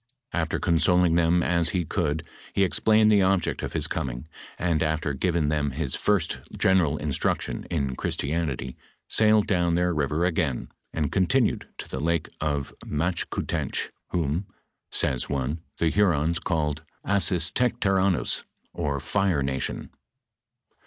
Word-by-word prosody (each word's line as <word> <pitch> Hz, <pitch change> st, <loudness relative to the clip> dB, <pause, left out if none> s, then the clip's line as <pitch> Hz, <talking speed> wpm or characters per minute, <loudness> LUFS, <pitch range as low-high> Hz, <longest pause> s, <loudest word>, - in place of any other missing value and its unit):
After 80 Hz, -2 st, 0 dB
consoling 90 Hz, 0 st, +3 dB
tbem 85 Hz, +1 st, +3 dB
as 85 Hz, -2 st, +2 dB
ho 90 Hz, -2 st, +1 dB
conld, 80 Hz, -3 st, -1 dB, 0.3 s
he 100 Hz, -, +3 dB
ex 85 Hz, -, -2 dB
plained 110 Hz, 0 st, +5 dB
the 105 Hz, -2 st, +5 dB
object 95 Hz, -2 st, +1 dB
of -, -, -4 dB
his -, -, +2 dB
coming, 65 Hz, +2 st, -3 dB, 0.3 s
and 85 Hz, -3 st, +1 dB
after 80 Hz, -2 st, 0 dB
given 85 Hz, +1 st, +1 dB
them 75 Hz, -2 st, 0 dB
hie 80 Hz, +4 st, -2 dB
first 95 Hz, +5 st, 0 dB, 0.2 s
general 85 Hz, -6 st, +3 dB
instruction 75 Hz, -3 st, -1 dB
in 70 Hz, -6 st, -1 dB
Christianity, 70 Hz, -4 st, -2 dB, 0.3 s
sailed 110 Hz, -1 st, +4 dB
down 85 Hz, -3 st, +2 dB
their 90 Hz, 0 st, +2 dB
river 75 Hz, +2 st, 0 dB
again, 80 Hz, -9 st, -1 dB, 0.2 s
and 75 Hz, -3 st, -1 dB
continued 105 Hz, +6 st, +2 dB
to -, -, -7 dB
the 65 Hz, -, -5 dB
town 85 Hz, +1 st, +1 dB, 0.2 s
of 75 Hz, -3 st, -1 dB
the -, -, -13 dB
Machkoutench, 85 Hz, +4 st, -2 dB, 0.2 s
whom, 85 Hz, +3 st, -1 dB, 0.4 s
sayr 65 Hz, -, +1 dB
»e, 70 Hz, +4 st, -2 dB, 0.2 s
the 80 Hz, -1 st, +2 dB
Hurons 85 Hz, -5 st, +2 dB
call 75 Hz, -4 st, -1 dB, 0.3 s
Assistaectaeronnous, 95 Hz, 0 st, +2 dB, 0.3 s
or 70 Hz, -1 st, -1 dB
Fire 95 Hz, -4 st, +1 dB
nation. 65 Hz, -1 st, -3 dB
85 Hz, 135 wpm, -26 LUFS, 75-95 Hz, 0.4 s, plained